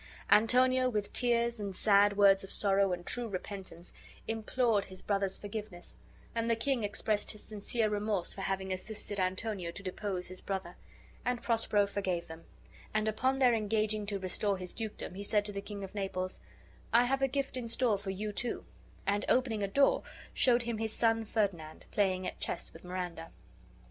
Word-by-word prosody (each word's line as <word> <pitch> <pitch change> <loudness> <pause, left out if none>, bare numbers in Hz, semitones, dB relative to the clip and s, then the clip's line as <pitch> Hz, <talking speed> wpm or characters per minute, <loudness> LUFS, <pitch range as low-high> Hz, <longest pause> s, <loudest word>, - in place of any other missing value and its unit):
Antonio, 255 +4 +5
with 210 -4 -2
tears 235 -1 +2
and 200 -2 -4
sad 205 0 +4
words 195 -1 +6
of 195 - -9
sorrow 195 -1 +3
and 175 -1 -3
true 245 -1 -1
repentance, 190 -3 -6 0.3
implored 225 -1 +1
his 185 -1 -9
brother's 195 -2 0
forgiveness, 205 -3 -7 0.4
and 230 0 -1
the 230 - +4
king 240 +1 0
expressed 205 0 0
his 210 - -10
sincere 215 +2 -1
remorse 210 -3 0
for 195 - -7
having 190 0 -1
assisted 205 +1 -4
Antonio 185 0 -1
to 195 +4 -6
depose 185 -1 -2
his 185 0 -3
brother: 190 -2 -4 0.5
and 245 0 -1
Prospero 225 -3 +3
forgave 190 -4 -2
them; 160 +1 -11 0.5
and, 215 0 +2
upon 255 +5 +1
their 255 -3 +5
engaging 215 -1 0
to 200 -1 -1
restore 195 +1 0
his 180 -1 -7
dukedom, 220 -4 -5
he 195 - -6
said 205 0 +2
to 205 - -3
the 200 0 -4
King 200 -1 -7
of 195 - -7
Naples, 190 -2 -3 0.5
"I 240 +1 +6
have 270 +2 0
a 270 - +4
gift 275 0 -2
in 250 -2 -3
store 230 -3 +1
for 195 -1 -6
you, 210 +2 -3
too"; 240 +4 -2 0.4
and, 205 +1 +1
opening 245 -4 +2
a 200 - +1
door, 275 +8 +4 0.3
showed 245 -2 +4
him 235 -2 -3
his 220 -1 0
son 225 -1 +2
Ferdinand 190 -8 -2
playing 185 -2 +1
at - - -5
chess 170 - -3
with 165 - -13
Miranda. 180 -2 -5
205 Hz, 180 wpm, -32 LUFS, 190-225 Hz, 0.5 s, words